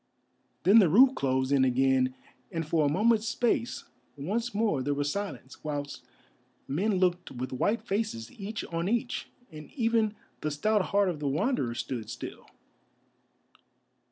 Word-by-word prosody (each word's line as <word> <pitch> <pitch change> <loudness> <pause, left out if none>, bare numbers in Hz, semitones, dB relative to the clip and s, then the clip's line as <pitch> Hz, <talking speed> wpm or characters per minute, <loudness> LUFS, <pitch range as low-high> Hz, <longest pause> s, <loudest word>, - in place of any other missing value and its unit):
Then 205 +5 +7
the 190 -6 +5
roof 255 - +7
closed 130 - 0
in 140 -2 +4
again, 130 0 +2 0.4
and 165 -2 -3
for 160 -1 +2
a - - +1
moment's 220 +5 +3
space 240 +2 0 0.3
once 220 +12 -2
more 205 - +1
there 145 +2 -1
was 145 0 0
silence, 200 -9 -6
whilst 145 -2 -4 0.6
men 195 +9 0
looked 180 -1 +1
with 130 0 -5
white 205 - 0
faces, 195 - -2
each 215 +2 -6
on 170 +3 -1
each, 240 +2 -1 0.2
and 155 -1 -10
even 225 -4 +1 0.2
the 155 - -2
stout 200 +7 +1
heart 200 0 +2
of 165 -4 -4
the 145 - -2
Wanderer 140 - 0
stood 120 -3 -4
still. - - -8
175 Hz, 150 wpm, -29 LUFS, 140-220 Hz, 0.6 s, Then